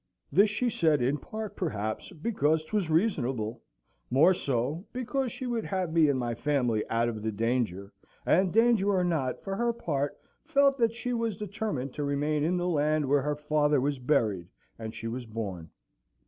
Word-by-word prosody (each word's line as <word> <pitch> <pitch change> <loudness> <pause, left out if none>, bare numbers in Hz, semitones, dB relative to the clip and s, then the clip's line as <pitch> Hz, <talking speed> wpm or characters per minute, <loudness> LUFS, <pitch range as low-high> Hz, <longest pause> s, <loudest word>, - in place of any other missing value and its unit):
This 205 +3 +5
she 230 +4 -1
said 160 -9 +2
in 140 +4 +1
part, 215 +7 -6
perhaps, 110 - -3
because 160 -4 0
'twas 190 +1 -1
reasonable; 130 - 0 0.5
more 155 +9 +5
so 140 +2 -1
because 255 +1 -2
she 260 0 -6
would 235 -3 -2
have 185 -4 -2
me 160 -3 +5
and 140 - +2
my 120 -2 -1
family 120 -4 0
out 115 +1 +1
of 110 -2 -3
the 110 +1 -1
danger; 105 -3 -1 0.3
and 185 +1 +3
danger 225 -2 +4
or 190 -2 +2
not, 155 -8 -1
for 195 -1 -3
her 235 0 +2
part 145 -11 -2 0.3
felt 280 -3 +3
that 230 -1 +2
she 245 +1 -3
was 230 -4 -1
determined 200 -10 -3
to 150 - -3
remain 145 +1 0
in 175 +4 +1
the 175 0 -1
land 155 -3 +1
where 140 +1 +3
her 150 +2 -1
father 150 -1 +2
was 140 +1 -1
buried, 110 - +1 0.3
and 110 -1 -6
she 115 - -5
was 120 +1 -5
born. 100 -7 -5
150 Hz, 180 wpm, -29 LUFS, 125-200 Hz, 0.5 s, This